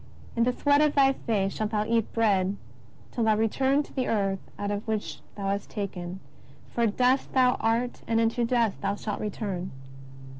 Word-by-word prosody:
In 230 0 +3
the 250 - +3
sweat 285 +3 +3
of 300 -1 +3
thy 270 -1 +5
face 200 -7 -1
shalt 215 -1 -2
thou 210 -1 0
eat 230 -1 +1
bread 200 -4 +2 0.5
till 235 - -1
thou 220 -1 +4
return 265 +6 +2
to - - -16
the 260 -2 -1
earth 195 -3 0 0.2
out 205 0 -2
of 205 +2 -3
which 220 -1 -2 0.2
thou 200 - -5
wast 200 0 -2
taken: 185 -3 -5 0.5
for 235 -1 +2
dust 250 +5 +2
thou 255 -1 +5
art 230 +2 0
and 225 0 +2
into 230 +1 +1
dust 230 -3 +1
thou 200 - 0
shalt 205 0 -4
return." 195 -3 -3
225 Hz, 185 wpm, -27 LUFS, 205-245 Hz, 0.5 s, thy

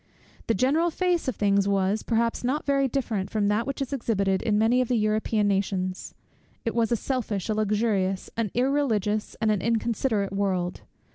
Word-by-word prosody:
The 230 - +2
general 295 - +2
face 355 -1 0
of 260 - -1
things 200 -1 +2
was, 200 +1 +1
perhaps, 230 0 0
not 270 +5 -1
very 275 -1 +2
different 230 -7 -2
from 205 -2 0
that 220 +4 0
which 275 0 -2
is 275 - -6
exhibited 200 -7 0
in 210 -2 +1
many 230 +4 +3
of 250 - -1
the 245 - +1
European 215 0 +1
nations. 190 -2 -2 0.5
It 230 - -1
was 230 -1 +1
a - - +4
selfish, 225 -6 -3
a - - +2
luxurious, 210 -3 0
an 225 -2 -1
irreligious, 230 -6 0
and 220 -2 +2
an 205 -3 0
inconsiderate 225 -2 0
world. 185 -3 -1
220 Hz, 180 wpm, -26 LUFS, 200-250 Hz, 0.5 s, a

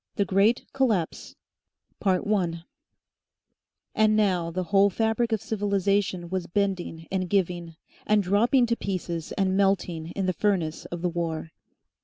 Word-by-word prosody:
THE 200 - +1
GREAT 200 +6 +2
COLLAPSE 225 -11 -1 0.7
1 185 -3 0 1.3
And 215 0 +3
now 185 -6 +2
the 185 +2 -2
whole 200 +3 +4
fabric 225 +3 0
of 220 -1 0
civilisation 200 -4 0
was 185 -1 -3
bending 180 -4 -2
and 185 -2 -1
giving, 175 -4 -1 0.3
and 210 -1 +3
dropping 230 +7 +3
to 235 0 0
pieces 175 -6 -4
and 190 -1 +1
melting 190 -5 +1
in 195 - -1
the 185 - +1
furnace 175 -4 -1
of 175 0 -6
the 180 - +2
war. 165 -2 -3
190 Hz, 135 wpm, -26 LUFS, 175-205 Hz, 1.3 s, whole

